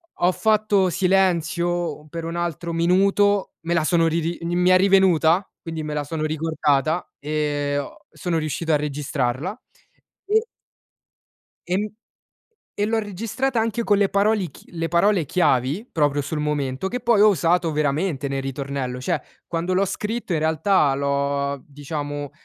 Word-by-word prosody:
ho 180 - +2
fatto 210 -2 +2
silenzio 175 -3 +1
per 165 +2 -6
un 165 +1 -4
altro 170 0 -3
minuto, 195 +4 +2
me 165 +1 -2
la 165 -2 +2
sono 165 +1 +3
ri 165 +1 +1
ri 170 +2 -2 0.2
mi 180 +1 +3
è 185 - +7
rivenuta, 190 -2 +4 0.2
quindi 165 -2 -5
me 150 0 -4
la 150 0 -1
sono 155 +2 -4
ricordata 155 0 0
e 145 -1 -1
ho 145 +7 -5
sono 175 -2 -2
riuscito 160 +1 -2
a - - +5
registrarla 145 - -2 0.7
e 440 +3 +2 1.2
e 180 - 0
m 210 +2 -1 0.9
e 205 - -1
l'ho 225 +1 +1
registrata 225 +5 -2
anche 230 +1 -1
con 205 -2 +3
le 200 -1 +3
parole 200 -2 +1
ch - - -16
le 165 -1 -3
parole 175 0 +2
chiavi 155 - +1
proprio 145 -2 +1
sul 150 +2 -4
momento 150 +1 -1
che 250 +5 -4
poi 235 -3 +3
ho 215 - +8
usato 175 -3 +2
veramente 150 0 0
nel 135 0 -2
ritornello. 135 -1 -4
Cioè, - - 0 0.3
quando 175 +2 -2
l'ho 190 +2 +3
scritto 210 +2 -3
in 165 - +1
realtà 160 -1 +2
l'ho, 140 0 -1
diciamo, 145 0 -5
165 Hz, 155 wpm, -23 LUFS, 145-195 Hz, 1.2 s, ho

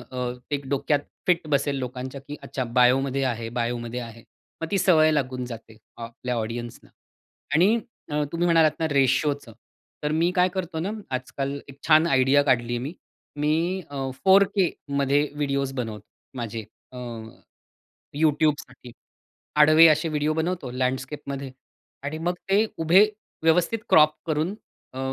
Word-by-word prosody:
अ, 125 0 -4 0.2
ते 145 -1 -1
डोक्यात 140 +1 +1 0.3
फिट 175 -3 +2
बसेल 140 0 +1
लोकांच्या 130 +1 -5
की 145 +2 -8
अच्छा, 130 - -4
बायोमध्ये 130 +3 +2
आहे, 115 -3 -2
बायोमध्ये 120 +1 -3
आहे. 115 -1 -10 0.4
मग - - -1
ती 200 - +1
सवय 165 -4 +5
लागून 130 -3 -1
जाते 115 -2 -10 0.2
आपल्या 120 +2 -5
ऑडियन्सना. 115 +1 -5 0.6
आणि 195 +9 +4 0.3
अ, 150 0 0
तुम्ही 170 +1 0
म्हणालात 165 -2 +5
ना 160 - 0
रेशिओचं, 140 -2 +1 0.5
तर 150 0 -1
मी 165 +3 +2
काय 180 +1 +4
करतो 175 -3 -3
ना 190 - -2 0.2
आजकाल 135 +2 -3
एक 140 - -12
छान 155 +1 +6
आयडिया 135 0 +4
काढलीये 120 -3 +1
मी. 135 +7 -5 0.4
मी 165 +5 0
अ, 135 -2 -3
4K 195 -1 +5 0.3
मध्ये 140 +2 +2
व्हिडिओज 140 -2 -1
बनवतो 110 -5 -5 0.3
माझे 115 -2 -4 0.3
अ, - - -11 1.2
YouTubeसाठी, 145 -5 0 0.6
आडवे 155 +2 +8
असे 155 +1 +2
व्हिडिओ 150 0 0
बनवतो 160 -4 -2
लँडस्केपमध्ये. 130 +2 -3 0.5
आणि 145 +3 -4
मग 180 - 0 0.2
ते 205 +3 +4
उभे 170 +5 +6 0.4
व्यवस्थित 170 +7 +3
क्रॉप 155 0 +6
करून 160 +4 -1 0.4
अ, 130 - -6
140 Hz, 140 wpm, -25 LUFS, 125-160 Hz, 1.2 s, आडवे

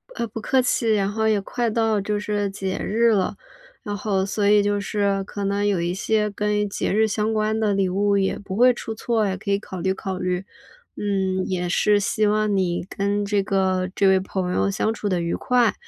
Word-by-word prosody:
呃， 235 - -2
不 225 +1 -7
客 260 +4 +2
气。 235 -2 +1
然 200 -1 +1
后 220 +1 0
也 215 -2 +3
快 240 +4 -2
到 220 -1 +1
就 205 +1 -2
是 205 -1 -1
节 195 -1 -4
日 230 +3 +2
了， 190 -4 +1 0.5
然 205 -1 -4
后， 195 -2 0
所 200 +1 0
以 205 0 +5
就 205 0 0
是 200 -1 0
可 200 +1 -6
能 200 +1 0
有 200 -4 +1
一 175 +1 -1
些 210 +2 0
跟 210 0 -1
节 - - -2
日 220 +2 +3
相 215 +1 -1
关 215 0 0
的 215 -2 +1
礼 195 -1 +1
物 200 +2 +1
也 195 -1 0
不 195 -2 -7
会 250 +3 +5
出 230 -1 -6
错， 225 0 0
也 190 -1 -1
可 200 +1 -7
以 200 - +3
考 190 -2 -8
虑 190 +2 0
考 190 0 -5
虑。 180 +1 -2 0.5
嗯， 190 -2 -1
也 180 -1 -2
是 205 +4 +3
希 215 +1 +1
望 210 0 +1
你 175 -2 0
跟 200 +1 -1
这 200 0 +1
个 190 -2 0
这 195 - +3
位 190 0 +5
朋 185 -1 -3
友 200 - +1
相 215 +2 0
处 210 -2 -3
得 180 -2 0
愉 170 0 -2
快， 245 -3 +2
205 Hz, 240 characters per minute, -23 LUFS, 190-215 Hz, 0.5 s, 以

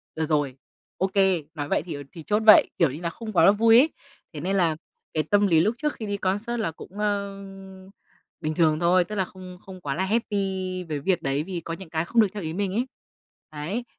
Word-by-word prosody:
được 160 - -1
rồi. 145 -4 0 0.4
Ô 190 - +1
kê. 190 -4 +2
Nói 145 -3 -4
vậy - - +2
thì, 175 - -5
ờ, 145 -1 -6
thì 165 - -9
chốt 210 +5 0
vậy, 215 - +8
kiểu 165 -6 +4
như 150 +5 -8
là 170 - -1
không 220 +3 -8
quá 170 +2 +6
vui 225 +2 +5
ấy. 295 +5 +4 0.4
Thế 150 - -6
nên 185 +6 -1
là 170 -5 +2 0.4
cái 155 -1 +1
tâm 205 +5 +3
lý 165 -3 +4
lúc 215 +6 +1
trước 300 +2 -1
khi 220 - -7
đi 205 -1 -2
concert 205 +5 -1
là 215 -7 -1
cũng, 160 - -12
ờ, 200 -1 -1 1.0
bình 155 0 -2
thường 155 -2 +3
thôi, 175 +2 +4
tức 210 +5 -7
là 190 -2 0
không 185 -1 -11
không 185 -1 -10
quá 140 -3 -3
là 190 - 0
happy 190 -4 -1
với 150 -2 -2
việc 180 +4 0
đấy 135 +2 -1
vì 175 -1 -5
có 165 - -5
những 185 -1 -9
cái 160 +1 -1
không 230 +6 +3
được 215 - +4
theo 205 - -5
ý 160 0 -4
mình 195 +1 -2
ấy. 245 +4 0 0.7
Đấy. 170 +11 -3
185 Hz, 240 wpm, -25 LUFS, 160-205 Hz, 1.0 s, vậy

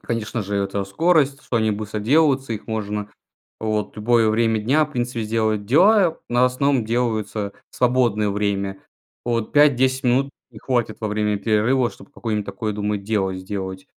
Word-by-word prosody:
Конечно 115 -1 -3
же, 100 +1 -3
это 100 0 -1
скорость, 145 - +1
что 120 - -2
они 110 -1 +2
быстро 105 0 -4
делаются. 135 +1 +2
Их 105 - -6
можно 105 -2 -3 0.5
вот 110 -2 -2
в - - -25
любое 115 0 +3
время 115 0 +2
дня, 140 +8 +3
в 150 - -11
принципе, 120 -2 -2
сделать 110 -2 -1
дела, 180 - +4
но 120 +1 +2
в - - +7
основном 125 -1 +1
делаются 110 -3 -1 0.2
в - - -16
свободное 120 -5 +2
время. 100 -1 -2 0.4
Вот 115 -2 -2
5-10 130 -3 +3
минут 135 +3 +2 0.2
и 110 - -12
хватит 120 -2 -1
во 110 - -2
время 105 0 0
перерыва, 115 +4 +1
чтобы - - -16
какое-нибудь 105 -6 -3
такое, 110 -1 -3
думаю, 105 0 -2
дело 100 -3 -1
сделать. 95 0 -6
110 Hz, 170 wpm, -22 LUFS, 105-125 Hz, 0.5 s, в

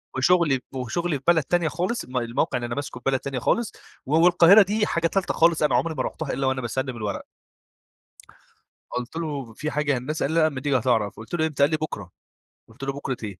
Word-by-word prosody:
وشغلي 150 -1 +3
وشغلي 140 +6 -2
في 135 - -17
بلد 165 -3 +5
تانية 175 +2 +1
خالص، 185 +9 -2
الم 125 0 -6
الموقع 120 +1 0
اللي 120 - -3
أنا 120 - -4
ماسكه 145 -3 -5
في - - -32
بلد 130 - +1
تانية 135 -2 -4
خالص، 230 - 0 0.3
و 145 +4 0
والقاهرة 180 +4 +7
دي 210 +2 +1
حاجة 170 0 +1
تالتة 195 +3 -1
خالص، 165 -1 +3
أنا 150 - +3
عمري 165 -2 0
ما 130 - -1
رُحتها 155 -4 -4
إلا 135 -1 -1
وأنا 130 0 0
باسلم 130 +1 -3
الورق. 105 -2 -3 1.7
قلت 125 +4 -5
له: 145 -8 -4
"في 150 +7 -4
حاجة 150 -1 0
يا 130 - +1
هندسة؟"، 145 +4 -2
قال 150 - -2
لي: 165 - +3
"لأ، 155 - +5
لما 130 -3 -6
تيجي 140 -2 +2
هتعرف."، 115 -4 0
قلت 110 +5 -11
له: 160 -1 +1
"إمتى؟"، 145 -2 0
قال 145 - +5
لي: 155 - +1
"بُكرة."، 105 - -6 0.6
قلت 120 +5 -13
له: 135 0 -2
"بُكرة 135 -2 -4
إيه؟". 100 -3 -6
140 Hz, 230 wpm, -24 LUFS, 125-165 Hz, 1.7 s, والقاهرة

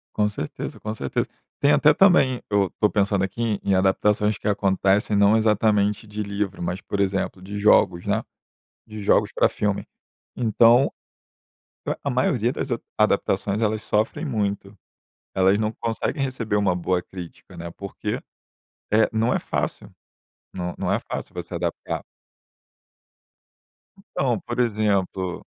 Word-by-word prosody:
Com 105 - +2
certeza. 105 -7 -5
Com 110 - -4
certeza. 70 -11 -2 0.3
Tem, 145 +1 +4
até, 150 0 +5
também, 145 -8 +4
eu 100 -3 +2
tô 105 - +4
pensando 100 -1 +1
aqui, 105 +2 -1
em 100 - +1
adaptações 105 +2 +2
que - - -5
acontecem 100 +1 +2
não 100 +2 +5
exatamente, 105 -1 +2
de 105 0 -5
livro, 100 -1 -3
mas, 90 +2 -3
por 100 - -4
exemplo, 95 -1 -1
de 100 +2 -6
jogos, 100 -4 +4
né. - - 0 0.6
De 110 -1 -8
jogos 100 - +3
pra - - +4
filme. 105 -1 -1 0.5
Então, 120 +2 +4 1.0
a - - 0
a - - 0
maioria 125 -2 +1
das 140 - -4
a 120 - 0 0.2
adaptações 100 0 +1
elas 110 -1 0
sofrem 110 +12 0
muito. 100 -5 -2 0.6
Elas 95 +1 +3
não 110 0 0
conseguem 115 +6 -3
receber 115 -6 -1
uma 100 -3 +2
boa 90 0 0
crítica, 90 -2 -11
né, 85 0 -6
porque, 100 +3 -5 0.7
eh, 110 +1 +5
não 110 +2 +1
é - - +2
fácil, - - -3 0.6
não 90 -1 -4
não - - -1
é - - +2
fácil - - -5
você - - -6
adaptar. - - -3 2.1
Então, - - 0
por 120 +1 -5
exemplo 100 -5 0
105 Hz, 145 wpm, -23 LUFS, 95-110 Hz, 2.1 s, até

